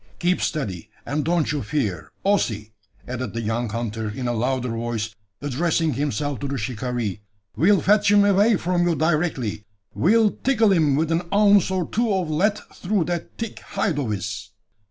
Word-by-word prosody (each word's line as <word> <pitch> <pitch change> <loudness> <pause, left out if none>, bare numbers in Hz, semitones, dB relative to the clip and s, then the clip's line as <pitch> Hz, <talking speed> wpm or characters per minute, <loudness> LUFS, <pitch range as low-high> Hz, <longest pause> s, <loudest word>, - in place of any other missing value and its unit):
Keep 180 +1 +1
steady, 105 - -3 0.2
and 145 +2 -1
don't 165 -2 +1
you 150 -2 -1
fear, 110 -6 -2
Ossy!" 110 - 0 0.3
added 125 -4 -4
the 115 - -1
young 115 +2 -1
hunter 110 -1 -3
in 125 +4 -4
a 120 - 0
louder 125 +2 -1
voice, 115 -1 -3 0.3
addressing 160 +3 0
himself 145 0 -2
to 140 - -3
the 140 0 -3
shikaree. 120 -3 -3 0.3
"We'll 195 +4 +4
fetch 205 +1 +4
him 205 0 +6
away 205 +3 +4
from 175 -1 +1
you 170 - +2
directly 155 -9 0 0.3
we'll 215 +5 +4
tickle 230 -6 +2
him 155 -7 +3
with 160 +3 0
an 170 +1 -1
ounce 205 -2 +5
or 185 -4 -1
two 230 0 0
of 180 -4 -1
lead 205 +7 +2 0.2
through 195 -1 0
that 175 0 -4
thick 230 -2 -5
hide 160 -7 -2
of 130 -6 -2
his." 105 +1 -4
150 Hz, 175 wpm, -23 LUFS, 115-180 Hz, 0.3 s, him